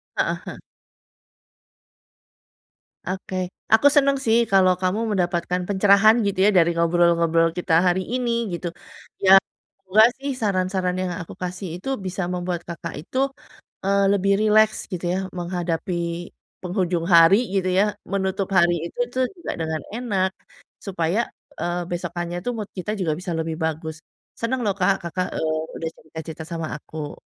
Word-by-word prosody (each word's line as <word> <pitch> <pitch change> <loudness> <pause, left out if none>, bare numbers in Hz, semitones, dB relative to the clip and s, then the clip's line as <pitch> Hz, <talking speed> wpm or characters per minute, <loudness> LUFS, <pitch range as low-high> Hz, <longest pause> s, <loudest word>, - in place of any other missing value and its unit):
Heeh - - 0
heeh. - - -7 2.5
Oke. 185 0 -5 0.4
Aku 225 +6 +7
senang 275 -1 +4
sih 225 0 +4
kalau 185 -1 +5
kamu 185 +3 0
mendapatkan 180 -1 0
pencerahan 200 +2 +5
gitu 200 -2 -1
ya - - +6
dari 170 -1 +5
ngobrol-ngobrol 170 -1 +3
kita 180 -1 -1
hari 180 +1 +2
ini, 245 -2 0 0.2
gitu. 175 +1 -3 0.6
Ya 190 - +5 0.5
semoga 195 +3 +5
sih 280 +1 -3
saran-saran 185 -2 0
yang 185 -1 -2
aku 165 - -9
kasih 180 +2 -4
itu 195 +9 -6 0.2
bisa 185 +1 -3
membuat 180 -1 -2
Kakak 170 -1 -6
itu, 185 - -7 0.7
eee, 200 0 +3
lebih 200 0 +2
rileks 215 0 +4
gitu 180 -1 -4
ya - - 0 0.2
menghadapi 175 0 -2 0.7
penghujung 180 -2 -1
hari 165 +3 +8 0.2
gitu 190 -1 +1
ya, - - +6 0.3
menutup 190 0 -1
hari 175 -1 +4
itu - - -12 0.2
tuh 260 0 +2
juga 345 - -5
dengan 160 -1 -2
enak 205 -6 0 0.6
supaya, 180 0 0 0.4
eee, 175 +1 -1
besokannya 175 0 -3
itu 245 - -2
mood 210 -2 -5
kita 185 +3 -3
juga 165 -4 0
bisa 180 -1 -4
lebih 160 0 -2
bagus. 160 0 -3 0.4
Senang 250 +3 -1
loh, 200 - +1
Kak, 190 +1 +3
Kakak, 175 +2 -2
eee, 155 0 0 0.2
udah 165 - -3
cerita-cerita 160 0 -9
sama 165 -1 -4
aku. 150 0 -8
180 Hz, 145 wpm, -23 LUFS, 170-200 Hz, 2.5 s, hari